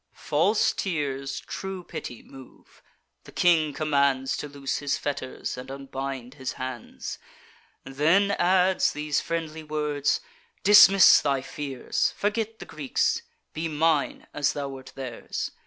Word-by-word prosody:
"False 190 +9 +2
tears 140 -6 -2
true 190 -2 -6
pity 120 -7 -7
move; 135 -1 -16 0.4
the - - -12
king 160 -4 +3
commands 140 -3 +1
To - - -5
loose 140 -1 -3
his 145 -1 -1
fetters, 135 -3 -4
and 125 +1 -8
unbind 135 -2 -6
his 130 -3 -5
hands: 130 -3 -6 0.6
Then 165 +9 +2
adds 185 -1 +3
these 150 -1 -1
friendly 160 -1 -4
words: 150 - 0 0.4
'Dismiss 195 -1 +8
thy 140 -2 0
fears; 135 -1 -2
Forget 220 +2 -1
the - - -9
Greeks; 145 -4 0 0.3
be 160 +1 -2
mine 155 -1 +1
as 145 0 +1
thou 140 -1 -4
wert 135 -1 -10
theirs. 130 -4 -5
145 Hz, 125 wpm, -26 LUFS, 135-165 Hz, 0.6 s, Dismiss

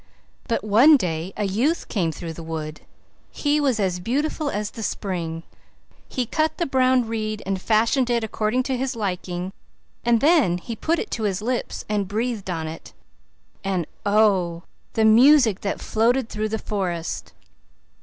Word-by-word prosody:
But 230 - -1
one 240 +9 +6
day 170 -4 -3
a - - -1
youth 235 - 0
came 175 -6 0
through 165 +1 -6
the 165 - -9
wood; 155 -2 -5 0.5
he 295 0 0
was 265 -6 +1
as 185 -3 0
beautiful 290 - -1
as 210 -2 -3
the 225 - -8
spring; 170 -6 -3 0.7
he 255 -3 -1
cut 310 +7 0
the 345 - 0
brown 255 -3 +3
reed 215 -1 -3
and 190 -1 -2
fashioned 230 +5 +2
it 235 -1 +1
according 220 +3 0
to 260 0 -1
his 260 0 -2
liking; 185 -3 -3 0.5
and 235 -1 +3
then 285 - +4
he 230 +6 -6
put 325 +9 0
it 425 - -4
to 225 - -2
his 195 -2 0
lips 240 +3 -3
and 205 -2 -1
breathed 220 -1 -2
on 165 -3 -2
it; 160 +1 -9 0.7
and, 190 -4 -1 0.2
oh, 195 -5 +2 0.3
the 220 - +2
music 235 -1 +6
that 200 - -2
floated 235 +2 +1
through 215 0 -2
the 220 - -1
forest! 180 -6 -3
215 Hz, 165 wpm, -23 LUFS, 185-250 Hz, 0.7 s, one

